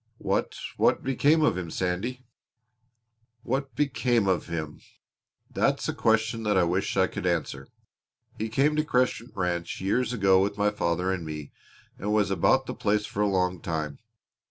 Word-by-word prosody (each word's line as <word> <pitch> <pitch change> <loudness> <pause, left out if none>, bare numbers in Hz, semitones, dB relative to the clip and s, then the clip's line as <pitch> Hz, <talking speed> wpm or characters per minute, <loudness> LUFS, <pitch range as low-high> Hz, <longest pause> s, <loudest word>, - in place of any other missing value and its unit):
"What - - -1 0.2
what - - +2
became 145 +4 +3
of 145 - +2
him, 85 -2 -5
Sandy?" 95 +10 -3 1.2
"What 135 +2 -2
became 125 -6 +1
of 95 -2 +1
him 80 -3 -5 0.7
that's - - 0
a - - -1
question 110 0 +1
that 105 -3 +1
I 95 - +5
wish 90 +3 -1
I - - +5
could - - -4
answer! - - -2 0.7
He 110 +1 -2
came 140 +7 +2
to 155 - +3
Crescent 125 -4 0
Ranch 90 -3 -2
years 115 +6 0
ago 95 -5 +4
with 100 +1 -1
my 105 0 +2
father 90 -2 0
and 95 -3 -2
me 75 -2 -7 0.5
and 105 +2 -2
was 105 -3 +2
about 130 +8 +3
the - - -4
place 105 0 0
for 105 - -3
a 105 - +3
long 90 -2 0
time. 75 -3 -3
100 Hz, 165 wpm, -27 LUFS, 90-125 Hz, 1.2 s, I